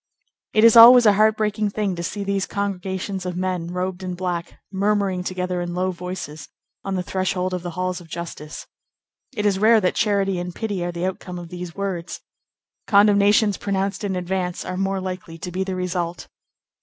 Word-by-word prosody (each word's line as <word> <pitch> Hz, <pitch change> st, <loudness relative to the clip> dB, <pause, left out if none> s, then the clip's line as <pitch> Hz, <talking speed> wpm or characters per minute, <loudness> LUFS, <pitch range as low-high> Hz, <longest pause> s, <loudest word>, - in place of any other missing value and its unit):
It 215 Hz, -, +4 dB
is 230 Hz, 0 st, +7 dB
always 240 Hz, +1 st, +10 dB
a 210 Hz, -, +7 dB
heart 215 Hz, +1 st, +3 dB
breaking 210 Hz, -1 st, 0 dB
thing 200 Hz, -2 st, -2 dB
to 170 Hz, -, -5 dB
see 200 Hz, +4 st, -4 dB
these 195 Hz, -1 st, -1 dB
congregations 190 Hz, -1 st, -3 dB
of 180 Hz, -1 st, -4 dB
men 180 Hz, -2 st, -2 dB
robed 180 Hz, +1 st, -3 dB
in 180 Hz, -1 st, -4 dB
black, 175 Hz, -1 st, -4 dB
murmuring 200 Hz, -2 st, 0 dB
together 180 Hz, -1 st, -2 dB
in 175 Hz, 0 st, -4 dB
low 185 Hz, +1 st, 0 dB
voices, 175 Hz, -4 st, -7 dB, 0.3 s
on 195 Hz, -1 st, -3 dB
the 180 Hz, -, -1 dB
threshold 185 Hz, 0 st, -1 dB
of 180 Hz, -, -2 dB
the 175 Hz, -, -5 dB
halls 185 Hz, 0 st, -2 dB
of 170 Hz, -, -14 dB
justice. 160 Hz, -2 st, -7 dB, 0.7 s
It 210 Hz, -, -2 dB
is 195 Hz, -2 st, +2 dB
rare 220 Hz, +2 st, +6 dB
that 185 Hz, -3 st, +1 dB
charity 195 Hz, -3 st, +1 dB
and 175 Hz, 0 st, -5 dB
pity 205 Hz, -5 st, -3 dB
are 175 Hz, -, -2 dB
the 170 Hz, +1 st, -3 dB
outcome 185 Hz, -1 st, -5 dB
of 175 Hz, -1 st, -8 dB
these 175 Hz, -1 st, -7 dB
words. 190 Hz, -4 st, -4 dB, 0.7 s
Condemnations 205 Hz, 0 st, +4 dB
pronounced 195 Hz, +1 st, -2 dB
in 195 Hz, -2 st, -1 dB
advance 180 Hz, 0 st, -3 dB
are 185 Hz, -, -4 dB
more 195 Hz, +1 st, -1 dB
likely 185 Hz, -3 st, -6 dB
to 180 Hz, +1 st, -6 dB
be 185 Hz, +2 st, -1 dB
the 190 Hz, -1 st, -4 dB
result. 180 Hz, -1 st, -3 dB
185 Hz, 190 wpm, -22 LUFS, 180-200 Hz, 0.7 s, always